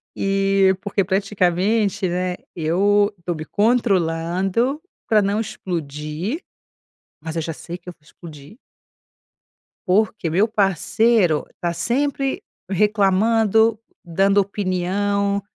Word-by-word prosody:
E 195 -1 +2
porque 200 -1 0
praticamente, 195 +1 +1
né, 180 +1 -1 0.2
eu 200 +6 +2
estou 175 0 -4
me 155 0 -6
controlando 195 - +1 0.3
para 215 -2 +4
não 200 +2 0
explodir. 170 - -4 0.8
Mas 160 0 -6
eu 165 - 0
já 165 - -4
sei 170 +2 -8
que 180 - -17
eu - - -5
vou 160 - -34
explodir. 150 - -13 1.3
Porque 195 -2 +1
meu 190 +7 +2
parceiro 200 -3 +2
tá 170 -1 -1
sempre 270 - -1 0.3
reclamando, 210 +2 +3 0.2
dando 195 +3 +1
opinião, 200 +1 0
195 Hz, 105 wpm, -21 LUFS, 175-210 Hz, 1.3 s, para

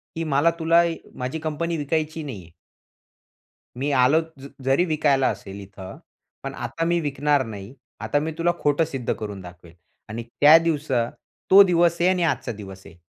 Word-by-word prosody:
की 165 - -3
मला 155 +2 +2
तुला 165 +1 +4 0.3
माझी 130 +5 -4
कंपनी 160 +2 -3
विकायची 155 +2 -2
नाहीये. 95 - -9 1.3
मी 145 - 0
आलो 140 +6 +4 0.2
ज 140 - -9 0.2
जरी 135 +7 +2
विकायला 145 -4 +2
असेल 100 +1 -7
इथं. 95 -1 -11 0.5
पण - - -5
आता 165 0 -4
मी 170 0 +1
विकणार 145 -1 +1
नाही. 105 +1 -9 0.3
आता 145 - 0
मी 160 +2 -3
तुला 175 +1 +2
खोटं 145 +2 +2
सिद्ध 135 -6 -3
करून 105 -3 -7
दाखवेल 90 -2 -13 0.4
आणि 115 +2 -5
त्या 145 +7 +6
दिवसा 140 -7 0 0.4
तो 195 - +10
दिवस 170 -2 +2
आहे 180 +2 +3
आणि 180 -2 +1
आजचा 125 - -5
दिवस 95 -1 -10
आहे. - - -14
145 Hz, 165 wpm, -23 LUFS, 115-165 Hz, 1.3 s, तो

